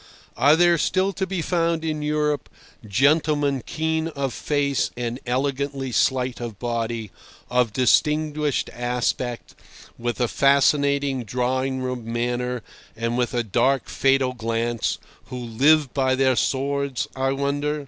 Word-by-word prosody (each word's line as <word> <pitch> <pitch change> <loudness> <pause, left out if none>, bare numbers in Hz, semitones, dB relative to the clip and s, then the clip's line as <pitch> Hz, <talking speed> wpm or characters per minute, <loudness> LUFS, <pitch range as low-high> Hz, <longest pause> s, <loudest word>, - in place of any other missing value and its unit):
Are 145 +3 +5
there 170 0 +4
still 190 +4 +1
to 190 0 -2
be 185 -3 -2
found 165 -2 0
in 155 -1 -2
Europe 150 -1 -1 0.4
gentlemen 145 +3 +2
keen 160 0 -1
of 140 -5 -3
face 140 -3 0
and 120 0 -3
elegantly 135 +1 -1
slight 125 0 +1
of 115 -4 -6
body, 115 -2 -3 0.4
of 125 -3 +2
distinguished 150 +5 +1
aspect, 120 0 -2 0.5
with 120 +1 -3
a 120 - +2
fascinating 140 0 +2
drawing 130 +3 -1
room 125 -3 -4
manner 120 0 -2 0.3
and 115 +1 -2
with 125 0 -1
a 120 - +1
dark, 130 +5 +1
fatal 135 -1 +2
glance, 115 -1 -1 0.3
who 125 - -7
live 130 +4 +2
by 130 -2 +2
their 130 -1 +3
swords, 140 0 -1
I 135 0 0
wonder? 145 +2 -1
135 Hz, 130 wpm, -23 LUFS, 120-145 Hz, 0.5 s, Are